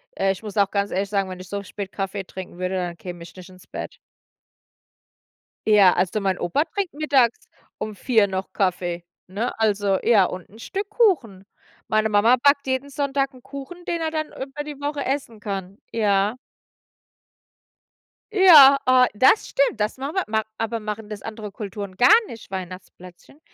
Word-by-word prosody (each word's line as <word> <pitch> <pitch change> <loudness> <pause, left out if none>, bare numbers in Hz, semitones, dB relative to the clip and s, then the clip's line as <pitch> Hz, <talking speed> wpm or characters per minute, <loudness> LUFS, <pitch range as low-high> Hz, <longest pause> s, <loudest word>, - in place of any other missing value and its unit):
Äh, 195 - +1
ich 190 - -6
muss 210 -2 -8
auch 200 -1 +2
ganz 200 0 0
ehrlich 195 +1 -1
sagen, 195 -2 0
wenn 185 0 -7
ich 185 - -12
so 200 0 -3
spät 200 0 -7
Kaffee 195 0 -4
trinken 185 -1 -9
würde, 185 +1 -2
dann 175 -2 -3
käme 175 -1 -8
ich 170 - -12
nicht 185 0 -12
ins 185 0 -17
Bett. - - -7 1.7
Ja, 205 -4 +6
also 190 +3 0
mein 190 -2 0
Opa 175 - 0
trinkt 395 -1 -4
mittags 275 -6 +1 0.3
um 215 -1 -5
4 220 -1 +2
noch 190 0 -5
Kaffee, 175 -3 -1 0.2
ne? 205 +6 -3
Also 205 -3 +2
ja, 210 -5 +5
und 180 0 -6
'n 215 +4 -17
Stück 395 - -4
Kuchen. 290 - +1 0.4
Meine 215 0 +1
Mama 215 +4 +5
backt 280 -1 +4
jeden 260 +2 -2
Sonntag 275 0 -1
'n 255 - -16
Kuchen, 280 +7 -9
den 340 -1 -2
er 320 -1 -2
dann 310 -1 -2
über 275 +2 -7
die 295 -2 -8
Woche 285 0 -3
essen 260 -5 -3
kann. 195 -1 -6
Ja. 205 -1 +1 2.0
Ja, 315 -9 +8
ah, 255 0 +5
das 260 - +4
stimmt. 275 -4 +1
Das 210 +3 -1
machen 275 +5 -5
wir 380 - +1
ma 220 0 0
aber 225 +1 -2
machen 210 0 -6
das 210 -2 -7
andere 215 -2 -7
Kulturen 200 -1 -7
gar 245 - +5 0.2
nicht, 225 - -11
Weihnachtsplätzchen? 185 - -9
215 Hz, 175 wpm, -23 LUFS, 190-270 Hz, 2.0 s, Ja